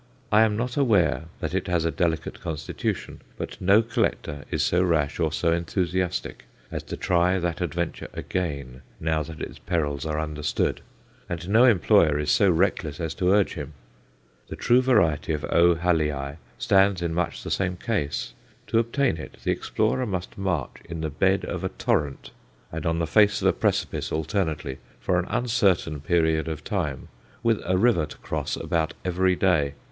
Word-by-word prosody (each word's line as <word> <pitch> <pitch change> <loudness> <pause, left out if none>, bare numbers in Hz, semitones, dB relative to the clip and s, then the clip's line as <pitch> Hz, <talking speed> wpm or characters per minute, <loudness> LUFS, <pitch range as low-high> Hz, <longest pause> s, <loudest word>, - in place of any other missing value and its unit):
I 105 - +6
am 110 -2 +3
not 125 +3 -2
aware 105 -11 +3 0.2
that - - -3
it - - -1
has 85 -2 +1
a 85 - +1
delicate 80 +1 -1
constitution; 75 -3 -4 0.2
but - - -6
no 100 +4 +5
collector 75 -10 -2
is - - 0
so 90 - +2
rash 80 -5 +1
or 80 -2 +1
so 85 +2 +1
enthusiastic 90 +1 -2 0.3
as - - -3
to - - -6
try 90 +1 +2
that 85 -1 -2
adventure 85 0 -2
again, 70 -8 -4 0.2
now 80 0 0
that 80 +1 -8
its - - -7
perils 75 -5 -1
are 75 0 -1
understood; 75 -1 -1 0.5
and 85 0 -4
no 110 +5 +6
employer 85 - +4
is 75 0 0
so 100 - +4
reckless 85 -4 +1
as 80 -2 -2
to 90 - 0
urge 100 -1 +3
him. 75 -2 -6 0.7
The - - -6
true 125 +1 +4
variety 90 - +2
of 75 -1 -2
O. 85 0 +5
Hallii 75 -4 0 0.2
stands 95 -2 +3
in 85 -1 -1
much 90 -1 -2
the - - -5
same 95 -2 0
case. 75 - -2 0.4
To 115 - +3
obtain 115 -1 +1
it 75 - -9
the - - +1
explorer 130 -1 0
must 90 -3 -4
march 90 -8 -2
in 85 -1 -6
the 80 -1 -2
bed 95 +6 +2
of - - -4
a - - 0
torrent 65 -5 -1 0.4
and 80 0 -3
on 85 0 +1
the 85 - 0
face 105 +4 +4
of - - +4
a - - +4
precipice - - -1
alternately 80 -4 -2 0.2
for 90 +9 +1
an 90 - -2
uncertain 105 -10 +1
period 80 +1 +1
of 80 -1 -4
time, 75 - -3 0.3
with 115 -2 +2
a 95 0 +2
river 95 -7 +3
to - - -11
cross - - -3
about 80 -2 -1
every 90 +1 +2
day. 80 -7 +2
85 Hz, 175 wpm, -25 LUFS, 75-95 Hz, 0.7 s, I